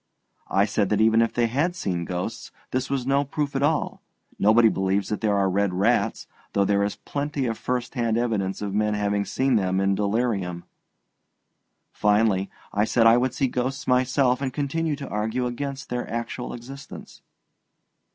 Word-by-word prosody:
I 100 +1 +3
said 105 -2 0
that 105 - +1
even 110 +1 +5
if 115 - +2
they 120 - +1
had 145 +10 0
seen 90 - -2
ghosts, 90 +1 -4 0.2
this 130 0 -1
was 135 -3 -1
no 140 +1 +2
proof 145 0 -3
at 135 - 0
all; 150 +2 0 0.4
nobody 110 +3 +6
believes 95 -1 0
that 105 - -2
there 105 -2 +2
are 100 -1 +2
red 95 0 0
rats, 105 +6 +1 0.3
though 100 - +3
there 100 0 +2
is 100 - -1
plenty 145 -1 -3
of 115 -2 -1
first 125 +1 -3
hand 115 -3 0
evidence 105 -5 -1
of 100 -1 -3
men 105 0 +1
having 100 -1 0
seen 130 +3 +1
them 95 -2 0
in 95 0 +2
delirium. 100 -4 -1 1.3
Finally, 105 -2 +2 0.2
I 105 - +2
said 115 +1 +2
I 115 +1 +7
would 125 0 0
see 135 - +1
ghosts 130 +2 -2
myself, 125 0 +2
and 135 -2 -1
continue 150 +3 -1
to 140 -1 -7
argue 110 +4 -1
against 135 +3 -4
their 125 0 -3
actual 115 +2 -4
existence. 135 +4 -10
115 Hz, 175 wpm, -25 LUFS, 100-130 Hz, 1.3 s, I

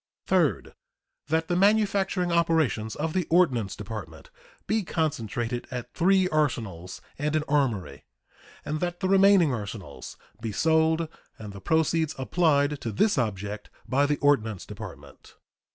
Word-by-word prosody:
Third. - - +1 0.5
That 160 +1 0
the 175 - 0
manufacturing 195 -2 +2
operations 160 -10 +1
of 155 +1 -3
the 185 -4 -1
Ordnance 130 - +2
Department 100 -8 -8 0.3
be 220 0 +1
concentrated 120 - -2
at 125 -1 -6
three 185 +1 +3
arsenals 110 - -2 0.2
and 150 +2 -1
an 155 - +1
armory, 130 -10 -1 0.6
and 155 +1 -2
that 175 0 -3
the 190 - -1
remaining 195 -5 +5
arsenals 105 -3 -7 0.2
be 115 -2 -3
sold 160 +6 +2 0.3
and 105 -2 -9
the 100 - -10
proceeds 160 - +1
applied 145 0 +1
to 115 - -3
this 165 - +2
object 105 -2 -3 0.2
by 140 +2 +2
the 145 0 0
Ordnance 110 -9 +2
Department. - - -11
150 Hz, 135 wpm, -26 LUFS, 110-170 Hz, 0.6 s, remaining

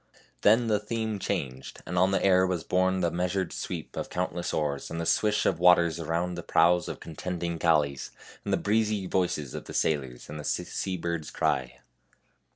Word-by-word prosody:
Then 115 +4 +5
the 105 -2 +2
theme 110 0 -3
was - - -5
changed, 65 0 -4
and 90 - -5
on 90 +2 +4
the 95 - +1
air 95 -1 +5
was 90 -3 -2
borne 95 0 +1
the 85 -1 +1
measured 90 +1 -1
sweep - - -5
of - - -4
countless 90 -1 -2
oars 75 -3 -2
and 85 - -4
the 85 - -2
swish 105 +4 +2
of 85 - +1
waters 85 -2 +5
around 85 +2 -1
the 85 - -5
prows 85 +1 +3
of - - -6
contending 85 +1 -4
galleys, 75 -5 +2 0.3
and - - -3
the - - +3
breezy 105 -1 +1
voices 90 -7 -1
of - - -6
the - - -8
sailors 65 -6 -1
and 75 +1 -7
the - - -6
sea 95 +4 -2
bird's 85 -2 -3
cry. 65 -2 -1
90 Hz, 190 wpm, -28 LUFS, 80-95 Hz, 0.3 s, Then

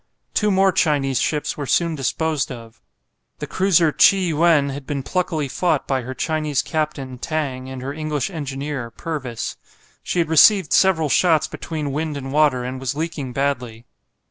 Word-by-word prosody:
Two 210 - +2
more 195 -1 +4
Chinese 145 -7 +1
ships 150 -1 -1
were 145 -2 -4
soon 170 +3 +2
disposed 155 0 -1
of. 115 -1 -11 0.6
The - - -5
cruiser 175 -4 +3
"Chi 195 - +5
yuen" 165 -5 +2
had 140 0 -7
been 140 -2 -3
pluckily 170 -3 -1
fought 155 +1 0
by 135 -2 0
her 130 +2 -7
Chinese 155 -2 -1
captain, 145 -5 -3
Tang, 130 -4 -3
and 130 -1 -7
her 140 +2 -4
English 155 0 -3
engineer, 140 -5 -4
Purvis. 125 -4 -5 0.4
She - - -4
had 170 -2 +2
received 175 +2 +5
several 175 -5 +4
shots 160 0 +3
between 155 -3 -5
wind 150 +1 -3
and 135 0 -6
water, 145 -5 +3
and 130 +1 -5
was 130 +1 -3
leaking 150 -5 -4
badly. 125 -4 -2
150 Hz, 165 wpm, -21 LUFS, 135-160 Hz, 0.6 s, Chi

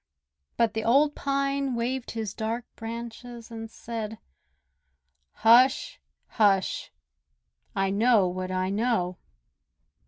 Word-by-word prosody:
But 230 -2 +2
the 220 - -2
old 285 +6 +4
Pine 275 -2 -1
waved 245 +2 -2
his 220 -3 -4
dark 230 +2 -3
branches 235 +1 -8
and 225 -1 -7
said: 225 -1 -6 1.1
"Hush! 255 - +4 0.2
hush! 200 -4 +1 0.8
I 195 0 +1
know 215 -1 +4
what 185 +1 -4
I 185 0 -1
know!" 200 -5 0
230 Hz, 100 wpm, -27 LUFS, 210-245 Hz, 1.1 s, old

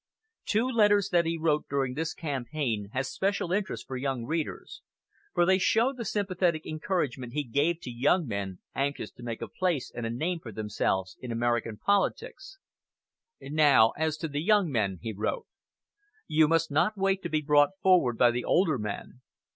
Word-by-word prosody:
Two 220 +4 +2
letters 205 -5 +3
that 170 -2 +2
he 165 0 -1
wrote 155 -2 0
during 135 -2 0
this 160 +3 -3
campaign 130 - -3
have 135 +1 -1
special 190 +5 -1
interest 195 +1 -2
for 130 - -6
young 130 -2 -2
readers, 160 +3 -4 0.5
for 175 - +4
they 190 +1 +4
show 230 +7 +2
the 240 -3 -6
sympathetic 185 -5 0
encouragement 150 -7 -2
he 150 +1 -1
gave 145 +7 0
to 125 - -6
young 145 +9 +2
men 100 -5 -4 0.2
anxious 140 +1 -2
to - - -16
make 115 -2 -5
a - - -4
place 180 -8 -1
and 115 -1 -4
a - - -3
name 160 +9 -2
for 120 -8 -9
themselves 95 -3 -2
in 125 - -6
American 115 -1 -1
politics. 295 - -1 0.8
"Now 145 -6 +4
as 160 0 -1
to 160 - -3
the 145 -1 -3
young 200 -2 +3
men," 100 -6 0
he 115 -2 -3
wrote. 105 +2 -2 0.8
"You 155 0 +3
must 165 -1 +1
not 205 +9 +2
wait 195 0 +1
to 170 - -4
be 155 -1 0
brought 145 +5 +3
forward 175 -11 +4
by 120 -1 +5
the 120 +1 -2
older 160 -8 +2
men. 105 +4 -6
150 Hz, 180 wpm, -28 LUFS, 120-180 Hz, 0.8 s, by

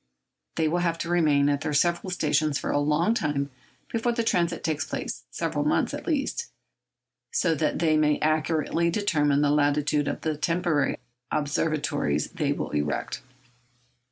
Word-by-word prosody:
They 160 - +1
will 170 +3 +1
have 170 -1 0
to 170 - -4
remain 150 -5 +3
at 145 -1 +1
their 150 -2 -2
several 175 +4 +1
stations 155 -4 +1
for - - -3
a 145 - +2
long 150 +8 +2
time 145 - -1 0.4
before 235 +1 0
the 230 -1 0
transit 170 -5 0
takes 155 -2 0
place—several - - -3
months, - - +1
at - - -6
least—so 295 - -3
that 155 0 0
they 160 -2 +3
may 150 -1 +3
accurately 155 +2 +1
determine 150 -7 +2
the 145 -1 +3
latitude 145 0 +2
of - - -3
the 155 -1 -1
temporary 165 0 0 0.3
observatories 145 - 0
they - - -1
will - - -3
erect. 75 -2 -2
155 Hz, 150 wpm, -26 LUFS, 145-170 Hz, 0.4 s, remain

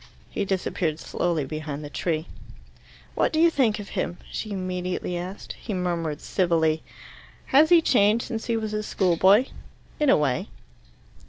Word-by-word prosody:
He 200 - -2
disappeared 180 -4 -1
slowly 165 -5 -1
behind 155 0 -5
the 145 - -7
tree. 160 -1 -1 0.9
"What - - +1
do 315 - 0
you 335 +1 +6
think 235 -8 +2
of 205 -2 -8
him?" 175 - -3
she 215 - -4
immediately 180 -2 -3
asked. 180 +3 -6
He 210 - -6
murmured 170 -4 -2
civilly. 160 -4 +1 0.7
"Has 300 +4 +7
he 340 -2 +6
changed 220 -3 +3
since 225 -2 -4
he 230 -1 +1
was 215 -1 -3
a 215 - -1
schoolboy?" 190 +3 +3 0.5
"In 300 -2 +3
a - - +6
way." 135 -5 0
185 Hz, 155 wpm, -25 LUFS, 165-220 Hz, 0.9 s, Has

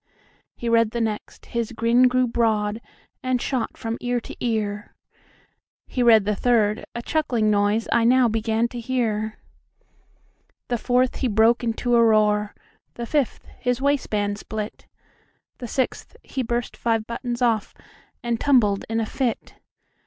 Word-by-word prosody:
He 240 - -5
read 230 -1 +4
the 235 - -4
next; 220 -2 -4
the 235 -1 -2
grin 235 +2 +4
grew 255 0 +2
broad, 220 -2 0 0.4
And 255 -2 0
shot 255 -1 -2
from 225 0 -4
ear 245 0 0
to - - -10
ear; 215 -3 -2 0.9
He 250 - -3
read 225 -4 +6
the 210 0 0
third; 215 -2 +1
a 235 - -4
chuckling 245 -9 +1
noiseI 210 +3 +2
now 255 0 +5
began 225 +1 0
to 240 - -6
hear. 220 -3 -1 1.3
The 240 -1 0
fourth; 250 +2 +1
he 260 - 0
broke 225 +2 +3
into 240 +1 0
a 235 - +6
roar; 210 -2 +3 0.4
The 235 - -4
fifth; 285 0 -1
his 245 -1 0
waistband 215 -8 0
split; 215 0 -6 0.7
The 245 - -5
sixth; 260 +3 -2
he 265 - -4
burst 240 0 -2
five 225 -2 0
buttons 240 +1 -3
off, 225 -4 +1 0.5
And 235 -1 -1
tumbled 225 -8 +3
in 225 0 0
a 225 - 0
fit. 245 +1 -3
230 Hz, 145 wpm, -23 LUFS, 215-245 Hz, 1.3 s, read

